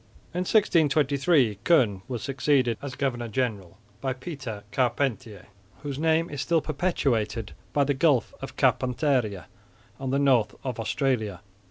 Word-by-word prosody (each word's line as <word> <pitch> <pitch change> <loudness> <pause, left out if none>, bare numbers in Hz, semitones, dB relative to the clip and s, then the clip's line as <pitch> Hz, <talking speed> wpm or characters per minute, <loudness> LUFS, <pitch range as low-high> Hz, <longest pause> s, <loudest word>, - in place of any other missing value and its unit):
In 180 +1 -1
1623 145 - +3
Koen 115 - +3
was 120 -4 -4
succeeded, 135 -3 +1
as 140 -3 -6
governor 120 -4 -2
general, 105 -7 -3 0.2
by 130 -1 -1
Pieter 130 -6 -7
Carpentier, 120 -5 -1 0.4
whose 140 -1 -4
name 160 +1 +2
is 145 -4 -5
still 165 +5 +2
perpetuated 135 - -1 0.2
by 145 - +2
the 145 +1 +1
Gulf 135 -4 +2
of - - -8
Carpentaria 125 - +1 0.5
on 135 -1 -3
the 135 - +1
north 135 -6 +3
of 125 -3 -4
Australia. 110 - -1
130 Hz, 135 wpm, -26 LUFS, 115-145 Hz, 0.5 s, 1623